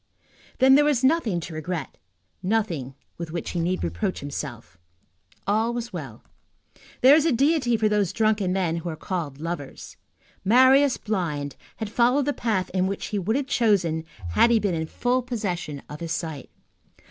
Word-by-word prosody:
Then 265 Hz, 0 st, +6 dB
there 290 Hz, +2 st, +6 dB
was 290 Hz, -4 st, +2 dB
nothing 260 Hz, -, +2 dB
to 165 Hz, -, -7 dB
regret, 155 Hz, -1 st, -5 dB, 0.4 s
nothing 180 Hz, -, -1 dB, 0.2 s
with 170 Hz, -1 st, -5 dB
which 170 Hz, +1 st, -4 dB
he 175 Hz, -, -2 dB
need 180 Hz, +2 st, -1 dB
reproach 85 Hz, -, -2 dB
himself. 120 Hz, -9 st, -7 dB, 0.7 s
All 220 Hz, +4 st, +1 dB
was 235 Hz, -2 st, -5 dB
well. 135 Hz, -11 st, -7 dB, 0.8 s
There 265 Hz, +3 st, +8 dB
is 310 Hz, -, +4 dB
a -, -, +3 dB
deity 265 Hz, -2 st, +2 dB
for 215 Hz, 0 st, +2 dB
those 210 Hz, -4 st, +1 dB
drunken 215 Hz, -4 st, +1 dB
men 180 Hz, -3 st, 0 dB
who 170 Hz, +1 st, -4 dB
are 160 Hz, -, -4 dB
called 155 Hz, -6 st, -4 dB
lovers. 160 Hz, -4 st, -6 dB, 0.5 s
Marius 260 Hz, +6 st, +5 dB
blind, 160 Hz, -10 st, -3 dB, 0.2 s
had 220 Hz, -2 st, -5 dB
followed 250 Hz, +4 st, +3 dB
the 290 Hz, -, 0 dB
path 210 Hz, -8 st, -1 dB
which 190 Hz, +1 st, -1 dB
he 205 Hz, -, -1 dB
would 210 Hz, +5 st, 0 dB
have 280 Hz, 0 st, 0 dB
chosen 195 Hz, -, +1 dB, 0.3 s
had 230 Hz, -, +5 dB
he 235 Hz, -, +5 dB
been 205 Hz, -4 st, 0 dB
in 160 Hz, -1 st, -2 dB
full 250 Hz, +8 st, 0 dB
possession 185 Hz, -, -4 dB
of 150 Hz, -, -8 dB
his 165 Hz, -1 st, -5 dB
sight. 160 Hz, -5 st, -5 dB
195 Hz, 170 wpm, -25 LUFS, 165-240 Hz, 0.8 s, There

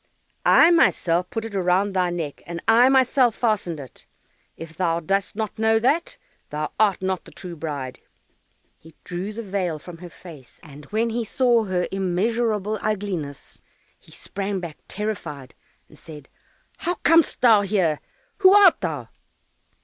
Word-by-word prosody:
"I 335 Hz, -, +7 dB
myself 180 Hz, -, +2 dB
put 225 Hz, -1 st, -4 dB
it 225 Hz, -, -8 dB
round 190 Hz, +1 st, +1 dB
thy 180 Hz, -2 st, +1 dB
neck, 165 Hz, -5 st, -5 dB
and 170 Hz, 0 st, -5 dB
I 235 Hz, +3 st, +6 dB
myself 260 Hz, -3 st, +3 dB
fastened 205 Hz, -9 st, -1 dB
it; 130 Hz, -4 st, -13 dB, 0.5 s
if 165 Hz, 0 st, -10 dB
thou 170 Hz, -1 st, 0 dB
dost 195 Hz, +5 st, -1 dB
not 215 Hz, 0 st, -4 dB
know 220 Hz, 0 st, +3 dB
that, 270 Hz, +9 st, 0 dB, 0.3 s
thou 150 Hz, +1 st, -4 dB
art 205 Hz, -3 st, +2 dB
not 185 Hz, -1 st, -2 dB
the -, -, -14 dB
true 175 Hz, -1 st, -8 dB
bride." 145 Hz, -5 st, -6 dB, 0.8 s
He 160 Hz, 0 st, -17 dB
drew 180 Hz, +4 st, -5 dB
the 230 Hz, +2 st, -6 dB
veil 185 Hz, -5 st, -2 dB
from 165 Hz, +2 st, -11 dB
her 175 Hz, 0 st, -10 dB
face, 155 Hz, -8 st, -14 dB
and 150 Hz, -2 st, -13 dB
when 225 Hz, +7 st, -1 dB
he 235 Hz, +1 st, -2 dB
saw 235 Hz, 0 st, +2 dB
her 180 Hz, -2 st, -1 dB
immeasurable 210 Hz, +3 st, -1 dB
ugliness, 190 Hz, -9 st, -4 dB, 0.4 s
he -, -, -21 dB
sprang 200 Hz, 0 st, -4 dB
back 170 Hz, -4 st, -8 dB
terrified, 185 Hz, -, -5 dB, 0.3 s
and -, -, -18 dB
said, 150 Hz, -4 st, -12 dB, 0.5 s
"How 350 Hz, +1 st, -2 dB
comest 330 Hz, -1 st, +3 dB
thou 225 Hz, -4 st, +6 dB
here? 185 Hz, -7 st, 0 dB, 0.4 s
Who 390 Hz, 0 st, +6 dB
art 400 Hz, -4 st, +6 dB
thou?" -, -, -4 dB
195 Hz, 155 wpm, -23 LUFS, 170-225 Hz, 0.8 s, I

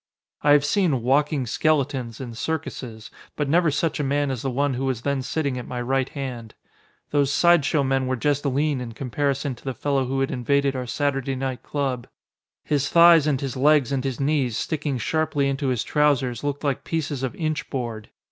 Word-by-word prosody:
I 145 Hz, 0 st, +5 dB
have 145 Hz, -1 st, +4 dB
seen 150 Hz, -, +1 dB
"walking 140 Hz, +2 st, +2 dB
skeletons" 135 Hz, -3 st, 0 dB
in 125 Hz, -3 st, -6 dB
circuses, 120 Hz, -5 st, -5 dB, 0.2 s
but 150 Hz, -, -1 dB
never 165 Hz, +3 st, +3 dB
such 155 Hz, +2 st, -1 dB
a -, -, 0 dB
man 140 Hz, 0 st, 0 dB
as 125 Hz, -4 st, -4 dB
the 135 Hz, -, -2 dB
one 140 Hz, +2 st, 0 dB
who 130 Hz, +2 st, -2 dB
was 125 Hz, -3 st, -2 dB
then 140 Hz, -1 st, 0 dB
sitting 140 Hz, -1 st, -2 dB
at 125 Hz, -, -8 dB
my 125 Hz, -, -4 dB
right 130 Hz, +2 st, 0 dB
hand. 125 Hz, -5 st, -6 dB, 0.6 s
Those 145 Hz, -2 st, +2 dB
side 170 Hz, +1 st, +4 dB
show 145 Hz, 0 st, +2 dB
men 135 Hz, -1 st, 0 dB
were 130 Hz, -, 0 dB
just 145 Hz, +3 st, 0 dB
lean 140 Hz, 0 st, 0 dB
in 115 Hz, -2 st, -6 dB
comparison 140 Hz, +3 st, -1 dB
to -, -, -15 dB
the 135 Hz, -2 st, -4 dB
fellow 140 Hz, +1 st, 0 dB
who 135 Hz, +2 st, -2 dB
had 135 Hz, -, 0 dB
invaded 140 Hz, +2 st, +1 dB
our 125 Hz, -1 st, -4 dB
Saturday 135 Hz, 0 st, -1 dB
night 130 Hz, -1 st, -3 dB
club. 135 Hz, -4 st, -3 dB, 0.6 s
His 145 Hz, -1 st, 0 dB
thighs 170 Hz, -2 st, +7 dB
and 140 Hz, -3 st, +1 dB
his 135 Hz, -3 st, -4 dB
legs 140 Hz, -1 st, +3 dB
and 135 Hz, -2 st, -1 dB
his 135 Hz, -3 st, -3 dB
knees, 135 Hz, -5 st, +1 dB
sticking 150 Hz, -2 st, -2 dB
sharply 145 Hz, +2 st, 0 dB
into 140 Hz, 0 st, -1 dB
his 125 Hz, -4 st, 0 dB
trousers, 135 Hz, -5 st, +1 dB
looked 145 Hz, 0 st, -3 dB
like 140 Hz, -3 st, -1 dB
pieces 155 Hz, -4 st, -3 dB
of 130 Hz, -2 st, -3 dB
inch 155 Hz, -2 st, -2 dB
board. 115 Hz, -5 st, -4 dB
135 Hz, 200 wpm, -24 LUFS, 130-145 Hz, 0.6 s, thighs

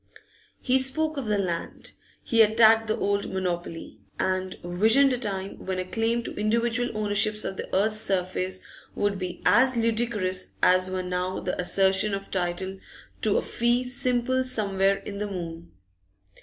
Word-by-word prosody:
He 260 Hz, +1 st, +2 dB
spoke 310 Hz, +4 st, 0 dB
of 275 Hz, -5 st, -4 dB
the 210 Hz, -1 st, +1 dB
land; 175 Hz, -4 st, -4 dB, 0.3 s
he 230 Hz, -1 st, +3 dB
attacked 220 Hz, +1 st, +5 dB
the 215 Hz, -, 0 dB
old 200 Hz, 0 st, -1 dB
monopoly, 175 Hz, -8 st, -4 dB, 0.2 s
and 185 Hz, 0 st, -1 dB
visioned 220 Hz, +10 st, +3 dB
a -, -, 0 dB
time 195 Hz, -4 st, -5 dB
when 190 Hz, -1 st, -3 dB
a 185 Hz, -, -2 dB
claim 225 Hz, +4 st, -1 dB
to -, -, -6 dB
individual 235 Hz, +3 st, 0 dB
ownerships 215 Hz, 0 st, +1 dB
of 190 Hz, -, -3 dB
the -, -, -6 dB
earth's 215 Hz, +3 st, +2 dB
surface 185 Hz, -1 st, -1 dB, 0.3 s
would 205 Hz, -1 st, 0 dB
be 180 Hz, -1 st, -6 dB
as 255 Hz, 0 st, +4 dB
ludicrous 220 Hz, -5 st, -1 dB
as 185 Hz, 0 st, +4 dB
were 185 Hz, 0 st, -3 dB
now 180 Hz, +1 st, -2 dB
the 180 Hz, -, -3 dB
assertion 195 Hz, +2 st, +2 dB
of 195 Hz, 0 st, -8 dB
title 190 Hz, +1 st, -2 dB, 0.4 s
to -, -, +2 dB
a -, -, 0 dB
fee 240 Hz, +1 st, +1 dB
simple 255 Hz, 0 st, 0 dB
somewhere 200 Hz, -6 st, +1 dB
in 200 Hz, 0 st, -7 dB
the 210 Hz, -, -2 dB
moon. 170 Hz, -3 st, -7 dB
205 Hz, 155 wpm, -26 LUFS, 185-230 Hz, 0.4 s, attacked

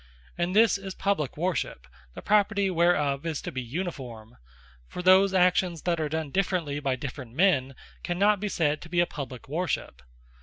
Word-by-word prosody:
And 175 Hz, +2 st, -2 dB
this 220 Hz, -2 st, +5 dB
is 195 Hz, -1 st, -7 dB
Publique 190 Hz, -10 st, -1 dB
Worship; 170 Hz, -, -2 dB, 0.3 s
the -, -, -8 dB
property 200 Hz, -1 st, +2 dB
whereof, 165 Hz, -5 st, +2 dB
is 165 Hz, -3 st, -3 dB
to -, -, -5 dB
be 130 Hz, -, -4 dB
Uniforme: 125 Hz, -, -6 dB, 0.5 s
For 180 Hz, -, -7 dB
those 190 Hz, +2 st, +6 dB
actions 180 Hz, -2 st, +2 dB
that 170 Hz, -2 st, 0 dB
are 150 Hz, -, -1 dB
done 160 Hz, -2 st, -3 dB
differently, 175 Hz, -6 st, -1 dB
by 135 Hz, -3 st, -1 dB
different 130 Hz, -2 st, -8 dB
men, 135 Hz, -7 st, +2 dB, 0.3 s
cannot 200 Hz, +4 st, +2 dB
be 210 Hz, +1 st, -2 dB
said 155 Hz, -5 st, 0 dB
to 170 Hz, -, -11 dB
be 175 Hz, 0 st, 0 dB
a 175 Hz, -, +5 dB
Publique 135 Hz, -7 st, -8 dB
Worship. 155 Hz, -, -3 dB
170 Hz, 175 wpm, -27 LUFS, 140-185 Hz, 0.5 s, those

